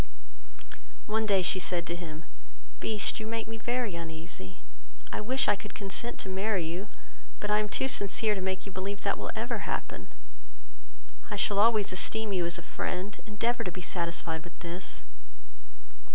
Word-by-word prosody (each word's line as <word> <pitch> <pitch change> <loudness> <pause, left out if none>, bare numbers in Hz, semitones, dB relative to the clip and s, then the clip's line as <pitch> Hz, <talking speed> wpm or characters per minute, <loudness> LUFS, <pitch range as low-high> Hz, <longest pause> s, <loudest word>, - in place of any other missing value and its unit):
One 220 +1 +1
day 195 -3 +5
she 185 - +5
said 175 -2 +1
to 170 - -1
him, 165 -2 -6 0.5
"Beast, 215 -1 +2
you 215 - -4
make 225 0 -1
me 225 0 -5
very 240 -2 0
uneasy, 160 - -5 0.5
I - - -1
wish 260 +5 +3
I 205 - +6
could 205 0 -9
consent 210 +4 -2
to - - -6
marry 190 -1 +1
you, 175 +5 -3 0.5
but 210 - -1
I 210 - +5
am 210 0 0
too 265 - +1
sincere 210 -2 +3
to 195 - -2
make 190 0 -1
you 200 - -6
believe 195 +2 -3
that - - +2
will - - -3
ever - - -1
happen: - - -2 1.2
I 210 - -2
shall 200 0 +3
always 215 -2 +5
esteem 215 +2 +2
you 180 -2 +2
as 170 - -2
a 170 - -7
friend; 190 +3 -3
endeavour 230 +3 +1
to 180 - -2
be 185 - -6
satisfied 170 -2 -1
with 175 - -11
this." 175 +2 -5
195 Hz, 175 wpm, -31 LUFS, 175-215 Hz, 1.2 s, I